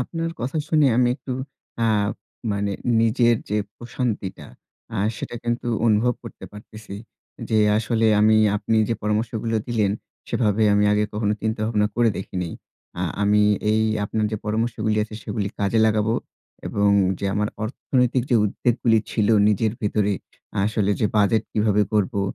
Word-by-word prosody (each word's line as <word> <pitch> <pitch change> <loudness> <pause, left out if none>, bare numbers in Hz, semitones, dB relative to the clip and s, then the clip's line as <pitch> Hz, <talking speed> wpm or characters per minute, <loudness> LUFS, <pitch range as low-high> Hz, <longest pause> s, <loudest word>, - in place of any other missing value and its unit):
আপনার 165 +5 -3
কথা 130 +6 -2
শুনে 155 -3 +4
আমি 125 0 +4
একটু 130 -1 -6 0.5
আ - - +3 0.7
মানে 100 0 -1 0.3
নিজের 115 +1 +3
যে 105 - +1 0.2
প্রশান্তিটা, 120 -5 -4 0.5
আ - - -2 0.2
সেটা - - -6
কিন্তু 120 +1 -2 0.2
অনুভব 115 +3 +3
করতে - - -10
পারতেছি। 105 0 -11 0.5
যে 110 - +2 0.2
আসলে 115 0 +1
আমি 110 +1 +5 0.2
আপনি 110 +2 0
যে 115 - +1
পরামর্শগুলো 110 +1 -1
দিলেন, 110 -4 +1 0.4
সেভাবে 110 -2 +1
আমি 105 - +3
আগে 105 0 +2
কখনো 105 0 0
চিন্তা 110 0 -1
ভাবনা 105 -2 +1
করে 120 -1 +4
দেখিনি। 90 -2 -4 0.5
আ - - 0 0.2
আমি 105 +1 +4 0.3
এই 110 +1 +2 0.2
আপনার 110 +1 -1
যে 110 - 0
পরামর্শগুলি 110 0 -1
আছে 110 - -11
সেগুলি 100 -2 -3
কাজে 100 +3 +2
লাগাবো। 110 +1 +1 0.5
এবং 100 0 +2 0.3
যে - - -5
আমার 105 0 0 0.2
অর্থনৈতিক 125 +2 0
যে 120 - +5
উদ্বেগ 110 +3 0
গুলি 115 -1 +4
ছিল 105 -2 +1 0.2
নিজের 105 +1 +1
ভেতরে 105 -1 +1 0.5
আসলে 105 -1 0
যে 110 - +3
বাজেট 105 +1 +3
কিভাবে 105 -1 +2
করবো, 105 0 +1
110 Hz, 150 wpm, -23 LUFS, 105-115 Hz, 0.7 s, আমি